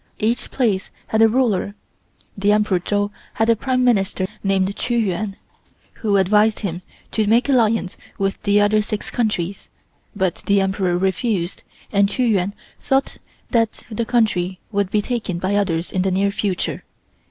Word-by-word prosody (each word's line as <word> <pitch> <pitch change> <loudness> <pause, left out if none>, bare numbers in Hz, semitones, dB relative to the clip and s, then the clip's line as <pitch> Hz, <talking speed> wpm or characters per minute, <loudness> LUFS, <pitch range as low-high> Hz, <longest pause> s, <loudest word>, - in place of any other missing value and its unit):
Each 230 +3 -1
place 215 -8 0 0.2
had 220 - +1
a 225 - +8
ruler. 220 -4 +1 0.6
The 200 +1 +2
Emperor 210 -3 +2
Chou 205 +3 -1 0.2
had 225 +1 +3
a - - +4
Prime 255 +3 0
Minister 195 -6 +2 0.2
named 195 0 +1
Chi 240 - -2
Yuan, 205 -2 -1 0.6
who 205 -3 +1
advised 210 +3 +3
him 180 -4 -3 0.3
to 215 -2 0
make 230 +5 +3
alliance 225 -7 +2 0.2
with 195 0 -1
the 205 0 +3
other 210 +1 +3
six 210 0 -4
countries, 200 -5 -2 0.5
but 190 -4 -1
the 200 0 +4
Emperor 190 -2 0
refused, 190 0 -1 0.3
and 200 -1 +3
Chi 255 - 0
Yuan 200 -4 +1 0.2
thought 270 0 0 0.3
that 230 -3 +1
the 225 +2 -1
country 190 -7 +1
would 200 -2 0
be 210 +1 +1
taken 225 -8 -2
by 185 +3 -1
others 180 -4 0
in 185 - 0
the 190 - +1
near 195 +2 +1
future. 200 -3 -2
205 Hz, 160 wpm, -21 LUFS, 190-225 Hz, 0.6 s, a